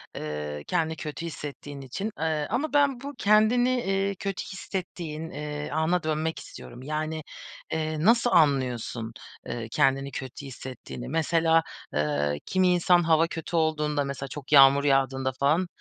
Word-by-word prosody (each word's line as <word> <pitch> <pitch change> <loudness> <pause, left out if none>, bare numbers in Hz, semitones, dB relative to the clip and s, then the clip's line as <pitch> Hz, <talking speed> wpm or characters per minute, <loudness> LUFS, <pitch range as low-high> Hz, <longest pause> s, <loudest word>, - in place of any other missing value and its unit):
eee, 75 -1 -5
kendini 160 0 0
kötü 155 +2 -6
hissettiğin 145 -3 -7
için, 195 - -4
eee, 155 -2 0
ama 285 +8 -1
ben 280 -4 +3
bu 285 +1 -6
kendini, 220 +4 +4
eee, 195 0 0
kötü 195 0 -4
hissettiğin, 170 -4 -5
eee, 150 +1 -5
ana 160 +3 +1
dönmek 155 +1 -1
istiyorum. 120 +1 -11
Yani, 155 +1 -3 0.5
eee, 155 -1 -1
nasıl 235 +2 +5
anlıyorsun, 125 -7 +1 0.3
eee, 115 -2 -4
kendini 135 +1 +2
kötü 130 +2 -7
hissettiğini? 130 -1 -8
Mesela, 165 +1 +3 0.3
eee, 75 -1 0
kimi 185 -1 +2
insan 175 0 +4
hava 165 0 +4
kötü 165 +1 -5
olduğunda, 150 -2 +1
mesela 140 -1 -5
çok 140 +2 -9
yağmur 140 0 +8
yağdığında 135 -1 +2
falan, 155 +6 +2
155 Hz, 140 wpm, -27 LUFS, 135-175 Hz, 0.5 s, yağmur